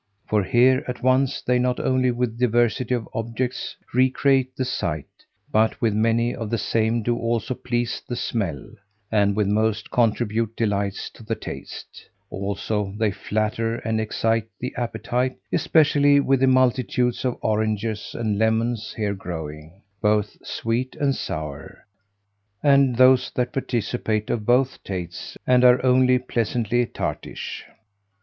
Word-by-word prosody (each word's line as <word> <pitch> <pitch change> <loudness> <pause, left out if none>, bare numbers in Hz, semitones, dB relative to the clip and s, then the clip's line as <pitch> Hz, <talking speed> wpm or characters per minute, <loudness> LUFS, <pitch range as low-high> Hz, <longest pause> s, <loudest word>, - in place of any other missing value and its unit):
For 105 -2 +2
here 130 +6 +4
at 125 -1 -5
once 130 +1 +2
they 125 0 +2
not 125 0 0
only 130 -1 +2
with 120 -1 -2
diversity 120 0 +2
of 115 -2 -4
objects 115 +2 -3 0.2
recreate 130 +1 +2
the 130 - -1
sight, 80 - -2 0.5
but 110 +1 +2
with 115 -3 +1
many 115 +2 +2
of 115 -3 -5
the 115 - 0
same 110 +1 0
do 120 +2 +1
also 115 +2 -1
please 120 -1 -2
the 120 - -2
smell, 95 - -2 0.5
and 100 -2 +3
with 105 -1 +2
most 110 +2 0
contribute 115 -1 +1
delights 100 -3 -1
to - - -14
the 115 +1 -2
taste; 70 -8 -9 0.2
also 100 +1 -3
they 110 -2 +1
flatter 110 +3 -1
and 110 -1 -2
excite 115 0 0
the 125 - -4
appetite, 125 +1 -2 0.2
especially 145 -3 +4
with 135 -1 +2
the 135 - +3
multitudes 125 -2 +2
of 125 -2 -1
oranges 110 0 -1
and 110 -3 -1
lemons 110 0 0
here 105 -2 0
growing, 80 -1 -8 0.2
both 105 -1 +1
sweet 120 +3 -2
and 140 -2 +1
sour, 80 +5 -6 0.8
and 140 -3 +4
those 130 +1 +5
that 125 0 -1
participate 115 -4 -1
of 110 -3 -2
both 130 +2 +2
tastes, 90 -3 -6
and 125 0 +4
are 125 0 +7
only 125 0 +5
pleasantly 120 -1 0
tartish. - - -5
115 Hz, 140 wpm, -23 LUFS, 105-125 Hz, 0.8 s, are